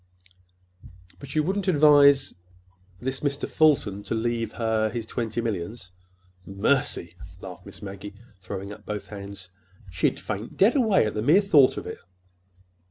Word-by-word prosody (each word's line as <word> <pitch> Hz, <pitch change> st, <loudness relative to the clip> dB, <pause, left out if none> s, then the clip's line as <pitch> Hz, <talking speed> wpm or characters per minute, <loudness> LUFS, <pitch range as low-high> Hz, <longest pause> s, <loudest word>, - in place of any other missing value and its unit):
"But 140 Hz, 0 st, -9 dB
you 155 Hz, -, +3 dB
wouldn't—er—advise 150 Hz, -7 st, +4 dB, 0.6 s
this 130 Hz, +6 st, -4 dB
Mr. 140 Hz, -1 st, -2 dB
Fulton 135 Hz, -11 st, +2 dB
to -, -, -2 dB
leave 115 Hz, -1 st, -2 dB
her—his 110 Hz, 0 st, -1 dB
twenty 115 Hz, 0 st, -3 dB
millions?" 100 Hz, -2 st, -5 dB, 0.5 s
"Mercy!" 100 Hz, +9 st, -1 dB, 0.2 s
laughed -, -, -10 dB
Miss -, -, -11 dB
Maggie, 100 Hz, +1 st, -8 dB, 0.3 s
throwing 100 Hz, +1 st, -6 dB
up -, -, -14 dB
both 105 Hz, -1 st, -6 dB
hands. 100 Hz, -2 st, -9 dB, 0.4 s
"She'd 90 Hz, 0 st, 0 dB
faint 110 Hz, +1 st, -6 dB
dead 210 Hz, +7 st, +4 dB
away 220 Hz, -, +3 dB
at 105 Hz, -, -2 dB
the 105 Hz, -, -2 dB
mere 150 Hz, -, +5 dB
thought 150 Hz, -10 st, +4 dB
of -, -, -5 dB
it." 90 Hz, -, -7 dB
115 Hz, 135 wpm, -25 LUFS, 100-145 Hz, 0.6 s, mere